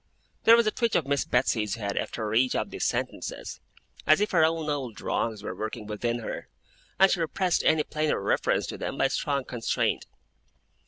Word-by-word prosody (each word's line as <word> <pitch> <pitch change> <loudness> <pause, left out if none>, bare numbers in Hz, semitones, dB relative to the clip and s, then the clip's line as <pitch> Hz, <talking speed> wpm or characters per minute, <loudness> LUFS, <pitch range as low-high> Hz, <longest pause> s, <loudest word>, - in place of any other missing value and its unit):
There 230 - +9
was 235 -1 +4
a 215 - +2
twitch 235 -1 0
of 160 - +2
Miss 140 0 0
Betsey's 115 -4 +1
head, 100 -3 -3
after 110 -2 -3
each 125 +3 +3
of - - -2
these - - -2
sentences, - - -3 0.5
as 155 - +6
if 210 - 0
her 165 -4 +4
own 160 -1 +1
old 135 -8 -3
wrongs 110 -3 -2
were - - -4
working 110 0 -5
within 115 +3 -2
her, - - -6 0.5
and 195 0 +6
she 180 - +1
repressed 175 +2 +1
any 155 -1 +3
plainer 155 0 -1
reference 100 - +1
to - - -6
them - - -4
by - - +3
strong 140 -2 -1
constraint. 120 -3 -1
140 Hz, 190 wpm, -27 LUFS, 110-165 Hz, 0.5 s, There